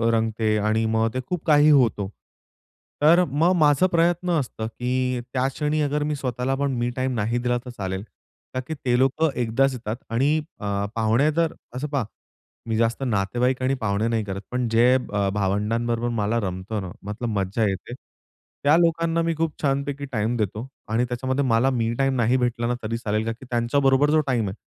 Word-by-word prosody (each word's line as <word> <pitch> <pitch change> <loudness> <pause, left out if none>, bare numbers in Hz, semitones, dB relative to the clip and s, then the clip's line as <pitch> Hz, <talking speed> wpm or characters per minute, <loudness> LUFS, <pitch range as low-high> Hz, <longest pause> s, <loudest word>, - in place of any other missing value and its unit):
रंगते 110 -1 0
आणि 110 +1 +1
मग 110 0 +2
ते 130 - -2
खूप 170 +6 -4
काही 150 -1 +5
होतो. 120 -9 +3 0.9
तर, 170 +4 +6
मग 160 +6 +2
माझं 150 +2 +4
प्रयत्न 175 +1 +1
असतं, 110 -3 -5
की 125 +2 -1
त्या 125 +2 -1
क्षणी 150 +2 -1
अगरमी 150 +1 0
स्वतःला 130 -1 -2
पण 140 - +1
मी 120 0 0
टाईम 130 0 -1
नाही 115 +2 0
दिला 120 0 0
तर, - - -7
चालेल. 95 -5 -4 0.5
ता - - 0
की 160 - -3
ते 125 -4 0
लोकं 145 +5 +2
एकदाच 130 +4 +2
येतात 115 -3 -4
आणि 120 +5 +2 0.3
अ, 100 -1 -2
पाहुणे 115 +7 +2
जर, 165 +1 0 0.2
असं 140 +4 -3
पहा 140 -3 -1 0.7
मी 110 - 0
जास्त 115 +3 0
नातेवाईक 120 +4 0
आणि 130 +1 +2
पाहुणे 100 +1 0
नाही 115 -2 0
करत. 100 0 -5
पण, 125 -1 0
जे 120 +3 +5
ब 100 -1 0
भावंडांबरोबर 115 +4 0
मला 115 0 0
रमतंना 95 +1 -4
मग 105 +1 -4
तर - - -1
मज्जा 95 +4 0
येते, 95 +5 -5 0.7
त्या 145 +2 +5
लोकांना 165 0 +2
मी 165 0 0
खूप 160 -1 -1
छानपैकी 140 0 -1
टाईम 110 +1 0
देतो. 105 +4 -2 0.2
आणि 115 +3 +1
त्याच्यामध्ये 130 +3 -1
मला 120 +1 +3
मी 115 -3 0
टाईम 135 -1 +2
नाही 120 +1 +2
भेटलाना 120 -1 0
तरी 115 +2 -2
चालेल. 110 -1 -1
कारण, 115 - -2
की 130 - -11
त्यांच्याबरोबर 135 +4 +2
जो 155 - +4
टाईम 120 -5 +1
आहे. 95 - -5
125 Hz, 180 wpm, -24 LUFS, 110-140 Hz, 0.9 s, तर